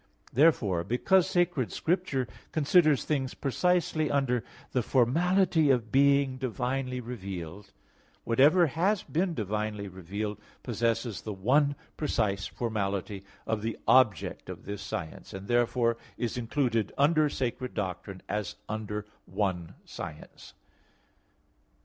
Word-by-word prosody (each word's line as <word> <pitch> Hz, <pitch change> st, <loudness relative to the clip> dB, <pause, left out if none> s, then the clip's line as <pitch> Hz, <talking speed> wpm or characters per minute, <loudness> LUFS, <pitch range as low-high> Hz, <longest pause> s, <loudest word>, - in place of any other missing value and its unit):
Therefore, 115 Hz, -, +3 dB
because 165 Hz, -, +2 dB
Sacred 175 Hz, -8 st, +1 dB
Scripture 160 Hz, -7 st, 0 dB, 0.2 s
considers 155 Hz, -1 st, +4 dB
things 135 Hz, -4 st, -1 dB
precisely 155 Hz, +1 st, +1 dB
under 125 Hz, -4 st, +1 dB, 0.3 s
the 125 Hz, -, +1 dB
formality 160 Hz, -, +3 dB
of 120 Hz, -5 st, +2 dB
being 140 Hz, -1 st, +4 dB
divinely 130 Hz, 0 st, -2 dB
revealed, 100 Hz, -5 st, -7 dB, 0.5 s
whatever 145 Hz, +10 st, +5 dB
has 180 Hz, +7 st, +1 dB
been 175 Hz, +2 st, -1 dB
divinely 105 Hz, -1 st, -2 dB
revealed 100 Hz, +3 st, -5 dB, 0.2 s
possesses 115 Hz, -2 st, -1 dB
the 110 Hz, -, -5 dB
one 140 Hz, +9 st, +3 dB, 0.2 s
precise 100 Hz, -10 st, 0 dB
formality 100 Hz, -4 st, -3 dB, 0.2 s
of 110 Hz, -1 st, -1 dB
the 115 Hz, 0 st, -3 dB
object 130 Hz, -6 st, +3 dB
of -, -, -8 dB
this 100 Hz, 0 st, -5 dB
science; 80 Hz, -3 st, -6 dB
and 95 Hz, +1 st, -8 dB
therefore 120 Hz, -1 st, +2 dB, 0.2 s
is 120 Hz, -, -2 dB
included 120 Hz, -2 st, 0 dB
under 150 Hz, +1 st, +4 dB
sacred 125 Hz, -1 st, -3 dB
doctrine 95 Hz, 0 st, -4 dB
as 105 Hz, 0 st, -3 dB
under 105 Hz, -1 st, -4 dB, 0.2 s
one 90 Hz, -5 st, -2 dB
science. 80 Hz, -3 st, -9 dB
120 Hz, 115 wpm, -29 LUFS, 105-145 Hz, 0.5 s, whatever